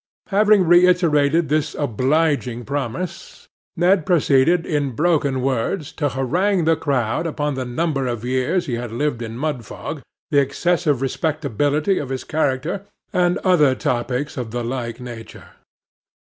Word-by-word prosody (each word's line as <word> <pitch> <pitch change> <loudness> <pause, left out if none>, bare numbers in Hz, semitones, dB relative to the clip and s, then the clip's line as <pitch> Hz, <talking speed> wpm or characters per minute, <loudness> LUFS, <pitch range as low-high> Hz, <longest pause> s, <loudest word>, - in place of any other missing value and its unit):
Having 210 0 +4
reiterated 170 -3 +4
this 150 +1 0
obliging 135 -1 0
promise, 145 +5 -5 0.3
Ned 180 +1 +3
proceeded 165 -1 +3
in 145 -4 -1
broken 145 -3 +1
words 135 +5 -1
to 145 -2 -1
harangue 170 - 0
the 165 0 +4
crowd 140 0 -1
upon 150 -2 -2
the 130 -1 -3
number 135 +1 -1
of 120 -1 -4
years 130 +8 0
he 130 - -4
had 120 -1 -5
lived 120 0 -1
in 115 0 -6
Mudfog, 135 -6 -4 0.3
the 145 - +5
excessive 145 0 0
respectability 150 - 0
of 140 - -5
his 130 -1 -3
character, 155 +4 -1 0.3
and 180 0 +2
other 150 -8 +4
topics 125 +4 -2
of 125 -3 -4
the 120 +1 -3
like 120 -1 -4
nature. 120 -3 -10
145 Hz, 135 wpm, -21 LUFS, 125-165 Hz, 0.3 s, the